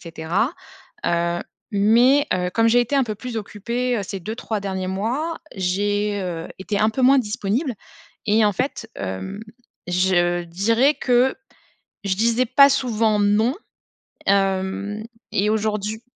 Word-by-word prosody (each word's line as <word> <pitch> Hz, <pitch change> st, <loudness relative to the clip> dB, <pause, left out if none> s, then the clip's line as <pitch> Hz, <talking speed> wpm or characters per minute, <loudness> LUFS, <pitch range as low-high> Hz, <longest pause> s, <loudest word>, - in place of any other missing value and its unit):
cetera. 170 Hz, -, -2 dB, 0.5 s
Heu, 170 Hz, 0 st, 0 dB, 0.3 s
mais, 235 Hz, +7 st, +4 dB
heu 180 Hz, 0 st, -1 dB
comme 225 Hz, +4 st, +3 dB
j'ai 240 Hz, +2 st, +5 dB
été 245 Hz, +4 st, -1 dB
un 270 Hz, -, +3 dB
peu 215 Hz, -3 st, -4 dB
plus 245 Hz, +2 st, -7 dB
occupée, 235 Hz, +4 st, -2 dB
heu, -, -, -2 dB
ces 195 Hz, 0 st, -6 dB
2-3 215 Hz, +2 st, -4 dB
derniers 190 Hz, -2 st, -3 dB
mois, 245 Hz, -, -2 dB, 0.2 s
j'ai, 205 Hz, +2 st, 0 dB
heu, 170 Hz, -3 st, -4 dB
été 200 Hz, +2 st, -2 dB
un 215 Hz, -, +3 dB
peu 260 Hz, +4 st, -2 dB
moins 270 Hz, +2 st, +6 dB
disponible 230 Hz, +3 st, -1 dB, 0.5 s
et 215 Hz, +1 st, +4 dB
en 205 Hz, -, +3 dB
fait, 245 Hz, +1 st, -3 dB
hem, 95 Hz, -, -5 dB, 0.5 s
je 175 Hz, -1 st, +2 dB
dirais 225 Hz, -, +2 dB
que 250 Hz, 0 st, +2 dB, 0.7 s
je 195 Hz, -1 st, +1 dB
disais 230 Hz, +5 st, +2 dB
pas 275 Hz, +4 st, +7 dB
souvent 225 Hz, -5 st, +1 dB
«non», 210 Hz, +5 st, +3 dB, 0.7 s
hem, 195 Hz, +1 st, 0 dB, 0.3 s
et 205 Hz, +2 st, +1 dB
aujourd'hu 215 Hz, 0 st, -1 dB
210 Hz, 140 wpm, -22 LUFS, 190-235 Hz, 0.7 s, pas